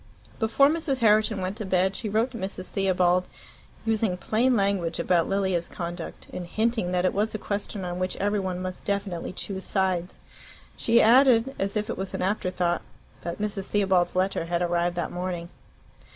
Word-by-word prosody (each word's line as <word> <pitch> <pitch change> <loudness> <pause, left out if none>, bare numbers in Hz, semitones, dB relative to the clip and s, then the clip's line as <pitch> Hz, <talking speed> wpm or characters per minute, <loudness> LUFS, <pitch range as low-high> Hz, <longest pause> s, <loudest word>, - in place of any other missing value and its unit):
Before 230 +5 +4
Mrs. 295 -4 0
Herriton 215 -2 +4
went 185 +3 -3
to 220 - -4
bed 190 0 +1
she 215 - -3
wrote 225 +5 +1
to 240 - -7
Mrs. 190 -1 -4
Theobald, 185 -2 +2 0.6
using 220 -4 +1
plain 240 +7 +2
language 195 -5 +1
about 175 -2 +2
Lilia's 190 -3 0
conduct, 170 -1 -6
and 180 -1 -5
hinting 220 -1 0
that 180 0 +1
it 185 - +2
was 215 +2 0
a - - 0
question 200 -2 -4
on 175 0 -4
which 185 0 -1
every 205 +1 0
one 185 -2 -3
must 185 0 -5
definitely 200 -4 -2
choose 190 +1 -5
sides. 185 -2 -1 0.6
She 235 0 +3
added, 250 +1 +5
as 195 +2 -1
if 210 0 -1
it - - -4
was 190 0 -4
an - - -2
afterthought, 180 -3 0 0.4
that 170 0 -4
Mrs. 205 -2 -3
Theobald's 190 -4 +2
letter 185 -2 +1
had 170 +1 0
arrived 175 0 0
that 175 - -2
morning. 175 -1 -4
190 Hz, 180 wpm, -26 LUFS, 180-215 Hz, 0.6 s, added